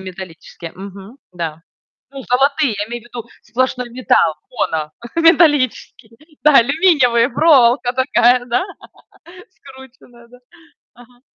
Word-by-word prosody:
металлические. 180 -3 -11
Мгм, 195 +5 -12 0.2
да. 165 -2 -6 0.5
Ну 275 0 -10
золотые. 275 0 +1
Я 205 - -3
имею 240 0 -7
в - - -21
виду 240 -1 -10
сплошной 250 +2 -3
металл, 235 -9 +1 0.2
моно, 160 -10 -3 0.2
металлические. 295 -8 +1 0.3
Да, 300 -2 +6
алюминиевые, 260 -3 +2
проволока 255 -6 +3
такая, 250 -1 +2
да, 245 +7 -1 0.9
скрученная, 265 -6 -17
да. 250 +1 -18 0.6
Ага. 245 0 -20
245 Hz, 110 wpm, -17 LUFS, 220-270 Hz, 0.9 s, Да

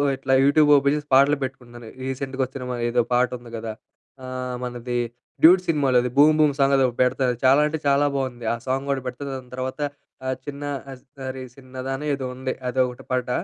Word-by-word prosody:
ఇట్లా 135 0 -1
YouTube 150 +1 +5
open 140 +1 +2
జేసి 150 0 -5
పాటలు 140 +2 +5
పెట్టుకున్నాను. 120 -3 -8 0.2
రీసెంట్‌గా 135 0 -3
వచ్చిన 130 0 -8
మ 120 - -3
ఏదో 120 0 +2
పాట 125 0 +3
ఉంది 120 -1 -13
గదా! 110 0 -5 0.5
ఆహ్, 130 -1 -4
మనది 120 0 -3 0.4
'డ్యూడ్' 180 +3 +8
సినిమాలోది 130 -6 +2
'బూమ్, 150 +2 +7
బూమ్' 150 -2 +4
సాంగ్ 140 0 +4
అది 135 - +4
ఒగటి 120 - -6
పెడతాను 125 0 +1
చాలా 135 +3 +6
అంటే 160 +1 -2
చాలా 140 +1 +4
బోంది. 125 -3 -4
ఆ - - 0
సాంగ్ 135 +2 -1
గూడా 135 -1 0
పెడతా. 125 +3 -6
దాని 130 -1 -10
తర్వాత 130 +2 -4 0.5
ఆహ్, 130 0 -1
'చిన్న 145 0 -6 0.6
అరె 130 0 -5
చిన్నదా' 130 0 -6
అని 150 - -6
ఏదో 135 -1 -5
ఉంది 130 0 -3 0.2
అదొకటి 125 -1 -1
పాట. 125 -1 0
130 Hz, 190 wpm, -23 LUFS, 125-140 Hz, 0.6 s, డ్యూడ్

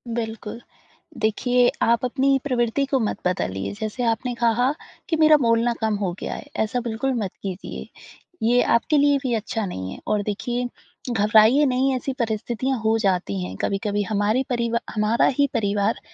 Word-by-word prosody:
बिल्कुल, 225 0 -5 0.6
देखिए 245 +3 +2
आप 235 +1 +3
अपनी 270 +2 +2
प्रवृत्ति 250 0 0
को 275 -1 0
मत 220 -3 -1
बदलिए, 95 - -2
जैसे 220 +3 -3
आपने 235 +2 0
कहा 235 +2 +2 0.4
कि 330 - +2
मेरा 310 -1 +6
बोलना 230 +1 +3
कम 220 -1 +1
हो 195 -3 -1
गया - - -4
है, - - -8
ऐसा 220 +3 0
बिल्कुल 240 +3 -2
मत 190 - -4
कीजिए। 190 -1 -6 0.6
ये 245 +1 +4
आपके 295 +6 +2
लिए 285 0 +4
भी 250 - 0
अच्छा 220 0 -2
नहीं 95 - -5
है - - -8
और 210 - +1
देखिए 240 +4 -2 0.4
घबराइए 220 +6 +5
नहीं 260 0 +1
ऐसी 260 +2 -3
परिस्थितियाँ 235 +3 -1
हो 220 0 +2
जाती 180 - 0
हैं। 90 +1 -6
कभी-कभी 205 +1 -1
हमारी 215 +4 +1
परिवा 235 -1 0
हमारा 215 +2 +2
ही 285 - +4
परिवार 205 -2 0
230 Hz, 165 wpm, -23 LUFS, 210-250 Hz, 0.6 s, मेरा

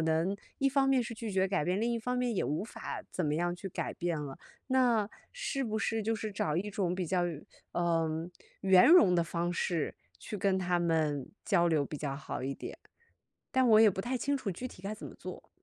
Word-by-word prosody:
能 160 +4 +1 0.2
一 275 - +1
方 270 0 +3
面 265 -2 +4
是 235 - -5
拒 220 -1 -5
绝 190 0 +2
改 190 -4 0
变， 180 +4 0
另 235 +2 +1
一 235 - 0
方 250 +2 -2
面 250 -2 0
也 - - +1
无 150 +7 -1
法 230 - -6
怎 180 - -1
么 150 - +1
样 175 +2 0
去 190 +2 -6
改 - - -3
变 170 -2 -2
了。 140 -2 -6 0.3
那 245 -5 +3 0.2
是 - - -2
不 220 -3 -1
是 225 0 0
就 225 +2 0
是 215 -1 -4
找 155 -5 -1
一 205 +4 -1
种 185 -3 0
比 185 0 -2
较 180 +1 +1
圆 160 -4 -6 0.3
呃， 165 -1 0 0.3
圆 190 +2 +7
融 315 - +7
的 170 - +4
方 170 +1 -2
式 175 -3 -1 0.2
去 210 - -6
跟 190 0 +2
他 180 -1 +1
们 155 -5 0
交 175 -5 +3
流 155 -3 +2
比 150 +1 -6
较 140 -2 -3
好 140 -2 -5
一 135 +1 -2
点？ - - -8 0.7
但 260 -2 +4
我 215 0 +7
也 225 - +8
不 190 -1 -1
太 250 +5 -2
清 280 +4 0
楚 245 -7 -3
具 195 +8 -5
体 185 - -12
该 200 +2 -3
怎 215 - -7
么 - - -11
做。 - - -9
185 Hz, 250 characters per minute, -31 LUFS, 165-225 Hz, 0.7 s, 也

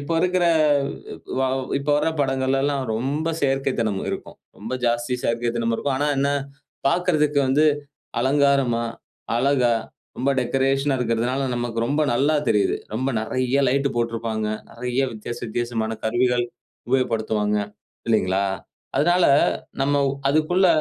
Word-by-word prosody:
இப்போ 140 +4 -2
இருக்குற 180 0 +2 1.0
வாவ் 130 0 0
இப்போ 145 +1 -2
வர 155 - +1
பாடல்கலெல்லாம் 135 +1 +1
ரொம்ப 140 +8 -1
செயற்கை 135 -1 +1
தனம் 105 -4 0
இருக்கும். - - -6 0.2
ரொம்ப 110 +4 -6
ஜாஸ்தி 120 +1 0
செயற்கைத்தனமும் 115 0 0
இருக்கும். 140 +2 -1
ஆனா 145 +1 +1
என்ன 140 +1 +2 0.6
பாக்கறதுக்கு 150 -3 +2
வந்து 140 +4 +3 0.6
அலங்காரமா, 135 -4 +2 0.5
அழகா 125 -2 +3 0.5
ரொம்ப 135 +2 +1
டெக்கரேஷன்னா 135 +2 +1
இருக்கின்றதனால, 125 +3 0
நமக்கு 120 -1 -3
ரொம்ப 145 +3 +1
நல்லா 145 +5 +2
தெரியுது. 385 +1 +2 0.2
ரொம்ப 130 +1 -1
நிறைய 130 +4 0
லைட் 140 +2 +2
போட்டிருப்பாங்க. 115 -2 -1 0.2
நிறைய 125 +2 -2
வித்தியாசம் 120 +2 -6
வித்தியாசமான 115 -1 -2
கருவிகள் 120 +2 +2 0.5
உபயோகப்படுத்துவாங்க. 110 -5 +1 0.5
இல்லைங்களா? 100 -3 +2 0.5
அதனால 175 +3 +3 0.6
நம்ம 140 +1 +2
வ் 135 - 0 0.2
அதுக்குள்ள 155 +6 +3
130 Hz, 120 wpm, -23 LUFS, 115-140 Hz, 1.0 s, வந்து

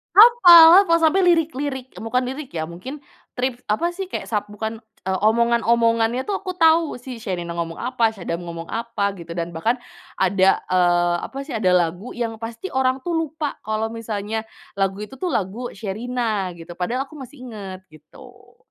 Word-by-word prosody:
Hapal 385 -5 +9
lah 335 - +4
sampai 325 +4 +4
lirik-lirik, 290 -6 0
bukan 250 +3 -1
lirik 265 +2 -6
ya 160 - -1
mungkin, 255 - -9 0.3
trip 250 -1 -1
apa 335 +12 +1
sih 380 +1 -5
kek - - -4
sab 210 -2 -1
bukan, 220 +2 -5 0.3
eee, 190 0 -1
omongan-omongannya 235 +1 +2
tuh 400 - -2
aku 370 -2 -5
tahu 325 -1 +4
si 250 -1 -9
Sherina 180 -6 -4
ngomong 165 -1 -3
apa, 240 -2 +1
Sadam 175 -3 -4
ngomong 170 0 -6
apa, 230 -3 -1
gitu. 170 0 -8
Dan 170 0 -3
bahkan 220 +10 0 0.4
ada, 190 0 +3
eee, 175 -1 +3
apa 270 - -9
sih, 290 - -7
ada 215 -5 +1
lagu 180 +6 -1
yang 225 -2 -3
pasti 230 +10 -6
orang 260 0 +2
tuh 350 - -1
lupa 315 -2 -3
kalo 220 +1 -2
misalnya 220 -1 -3 0.4
lagu 195 0 +1
itu 265 +4 -14
tuh 365 - 0
lagu 220 - -2
Sherina, 215 0 -2
gitu. 170 +1 -10
Padahal 245 +9 -1
aku 280 - -18
masih 265 +2 -11
inget 200 -6 -8
gitu. 155 0 -17
230 Hz, 170 wpm, -22 LUFS, 195-270 Hz, 0.4 s, Hapal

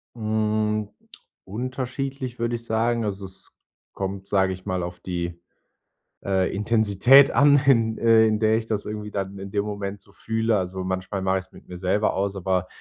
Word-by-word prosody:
Hm, 110 -1 0 0.5
unterschiedlich, 130 +3 -4
würde 120 0 0
ich 115 0 -8
sagen. 115 +1 0
Also, 100 -2 -3
es 95 0 -9 0.4
kommt, 95 0 -5
sage 95 -2 +2
ich 95 0 -11
mal, 95 -3 -2
auf 90 0 -6
die, 85 -1 -4 0.9
äh, 95 -1 0
Intensität 110 +5 +5
an, 145 +3 +6
in 115 -4 +3
äh, 115 -1 +5
in 110 -1 +1
der 110 0 +3
ich 115 - -3
das 110 -2 -2
irgendwie 105 0 -5
dann 100 -1 -4
in 95 0 -7
dem 100 0 0
Moment 100 -1 -5
so 100 - -19
fühle. 110 0 0
Also, 95 0 -3
manchmal 95 +1 -3
mache 95 0 +1
ich's 95 0 -11
mit - - -16
mir 90 - -8
selber 95 +4 +1
aus, 100 +1 -1
aber, 95 -1 0
105 Hz, 180 wpm, -24 LUFS, 95-115 Hz, 0.9 s, an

